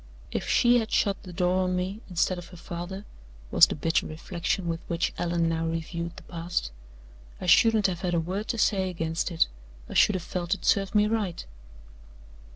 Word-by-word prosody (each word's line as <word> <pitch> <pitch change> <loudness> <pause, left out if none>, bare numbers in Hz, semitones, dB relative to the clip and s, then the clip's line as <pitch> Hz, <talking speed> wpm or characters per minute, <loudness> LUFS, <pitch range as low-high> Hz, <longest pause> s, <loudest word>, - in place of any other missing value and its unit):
"If - - -3
she 240 0 +5
had 220 -1 -3
shut 200 -2 +1
the 185 - -10
door 180 +1 +1
on 180 0 0
me, 190 +4 -3
instead 180 +1 0
of 175 - -10
her 180 - -13
father," 175 +4 -6 0.5
was - - +8
the - - -4
bitter 160 +2 0
reflection 170 +3 -3
with 165 -1 -1
which 170 0 -1
Allan 170 -1 +1
now 165 0 0
reviewed 170 +1 -4
the - - -10
past, 165 - -3 0.7
"I - - -6
shouldn't 215 +4 +5
have 180 -2 0
had 180 -3 0
a - - +3
word 185 +6 -3
to 235 - -2
say 190 -4 +2
against 165 -1 -2
it; 165 -2 +3 0.4
I - - -8
should 210 - +5
have 180 - -3
felt 175 +1 -2
it - - -11
served 195 0 +2
me 210 0 +5
right." 210 -5 -2
180 Hz, 195 wpm, -27 LUFS, 170-195 Hz, 0.7 s, was